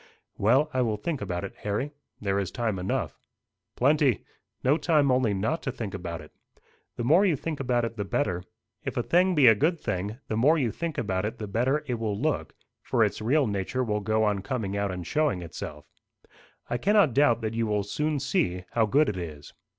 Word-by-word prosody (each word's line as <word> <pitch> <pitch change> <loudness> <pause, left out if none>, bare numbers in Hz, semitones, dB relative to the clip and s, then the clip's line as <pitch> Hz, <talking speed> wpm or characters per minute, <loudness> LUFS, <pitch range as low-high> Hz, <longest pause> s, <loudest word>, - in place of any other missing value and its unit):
'" - - -54
"Well, 130 +9 +3
I 130 - +2
will 110 -3 0
think 145 +6 -3
about 90 0 -3
it, 100 - -6
Harry. 105 +8 -2 0.3
There 100 -1 0
is 95 - -2
time 110 -5 -2
enough." 90 - -2 0.6
"Plenty. 140 - +3 0.4
No 135 +3 +4
time 155 -4 +3
only 125 -4 +2
not 110 +12 -1
to 135 - -2
think 110 -5 -5
about 85 -3 -5
it. 75 - -14 0.6
The 120 - -3
more 160 - +5
you 185 -6 +3
think 155 +2 -4
about 125 -3 +1
it 115 0 -6
the 100 - -1
better. 95 -5 -1 0.4
If 135 -1 -4
a 120 - +1
thing 180 +5 +3
be 145 -4 +5
a 115 - +9
good 160 - +1
thing, 100 +1 -3
the 110 - -2
more 145 +9 +4
you 125 -7 +1
think 165 +3 -4
about 95 -5 -1
it 110 +3 -3
the 110 - -5
better 125 +9 +1
it 120 -3 -2
will 105 -3 -2
look; 155 +4 -1 0.3
for - - +2
its - - -1
real 135 +6 +3
nature 105 +4 -1
will 105 -3 -1
go 110 +2 +1
on 105 -2 +1
coming 100 -2 -3
out 100 0 0
and 90 -2 -5
showing 145 - 0
itself. 75 -2 -7 0.8
I 120 - -2
cannot 200 - +4
doubt 125 -4 +4
that 110 0 -2
you 115 0 0
will 105 -1 0
soon 150 +8 -1
see 135 - 0
how 115 -2 +2
good 145 +9 +4
it 100 - -2
is." 75 -5 -7
115 Hz, 215 wpm, -27 LUFS, 100-145 Hz, 0.8 s, a